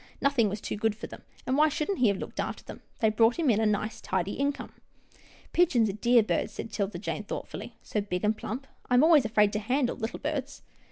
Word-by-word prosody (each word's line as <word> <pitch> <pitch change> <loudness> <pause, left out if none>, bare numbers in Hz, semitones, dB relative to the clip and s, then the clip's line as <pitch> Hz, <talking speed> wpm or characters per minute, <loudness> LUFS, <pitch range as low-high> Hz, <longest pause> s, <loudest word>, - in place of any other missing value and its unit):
Nothing 270 -6 +2
was 205 +2 -4
too - - -4
good 220 0 0
for 215 - -7
them, - - -10 0.2
and 260 - 0
why 310 +1 +5
shouldn't 320 +5 -2
he 245 - +5
have 200 -2 +2
looked - - -7
after - - -3
them? - - -10 0.2
They 220 -1 +4
brought 225 +2 +4
him 315 -7 +3
in 215 - +2
a 220 - +3
nice, 210 +1 -1
tidy 190 +1 -1
income." 280 +1 -2 0.4
" - - -26
Pigeons 255 -11 +3
are - - -2
dear 235 +3 +4
birds," - - -1
said - - -6
'Tilda 200 -3 -2
Jane, 210 +2 -4
thoughtfully, - - -7
" - - -43
so 210 - -2
big 180 -2 -3
and 210 +1 +2
plump. 250 +5 -5 0.2
I 250 - +3
am 250 - +6
always 310 -5 +6
afraid 210 -2 +3
to 210 - 0
handle 250 +4 0
little 225 +1 -4
birds." 285 -2 -4
225 Hz, 240 wpm, -28 LUFS, 210-275 Hz, 0.4 s, am